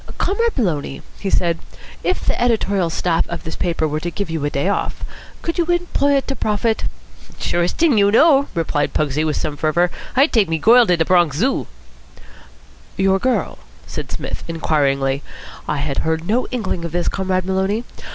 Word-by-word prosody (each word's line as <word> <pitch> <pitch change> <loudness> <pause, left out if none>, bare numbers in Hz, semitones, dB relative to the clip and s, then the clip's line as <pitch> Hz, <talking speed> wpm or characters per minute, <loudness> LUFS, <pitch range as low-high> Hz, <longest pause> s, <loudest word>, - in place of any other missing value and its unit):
"Comrade 460 +2 0
Maloney," 155 - -1 0.2
he 195 - -2
said, 170 -3 +1 0.4
"if 370 - -1
the - - 0
Editorial 205 -7 +1
Staff 165 0 0
of 170 - -5
this 160 - -6
paper 165 -3 0
were 150 0 -2
to 175 - -3
give 195 -1 -4
you 160 -3 -2
a 145 - +1
day 140 +4 -1
off, 200 - -2 0.4
could 335 +1 -2
you 340 - +3
employ 345 -5 +1
it 275 - 0
to 270 - -2
profit?" 220 0 0 0.5
"Surest 175 0 -1
t'ing 300 -10 +4
you 200 0 +5
know," 280 +5 +5
replied 160 -3 -1
Pugsy 150 0 +1
with 155 -1 0
some 150 - -2
fervour. 170 +4 +1 0.2
"I'd 275 +4 +4
take 215 -8 +3
me 165 - +1
goil 235 +7 +6
to 180 - +3
de 160 - +2
Bronx 175 -5 +3
Zoo." 255 - 0 1.3
"Your 195 0 +3
girl?" 255 +2 -1 0.3
said - - -6
Psmith - - -5
inquiringly. 140 -4 +1 0.5
"I 150 - -1
had 140 -1 -2
heard 160 +1 -1
no 235 +4 +1
inkling 210 -8 -3
of 170 -1 -5
this, 175 0 -1
Comrade 185 -1 0
Maloney. 190 +4 0
180 Hz, 180 wpm, -20 LUFS, 160-235 Hz, 1.3 s, goil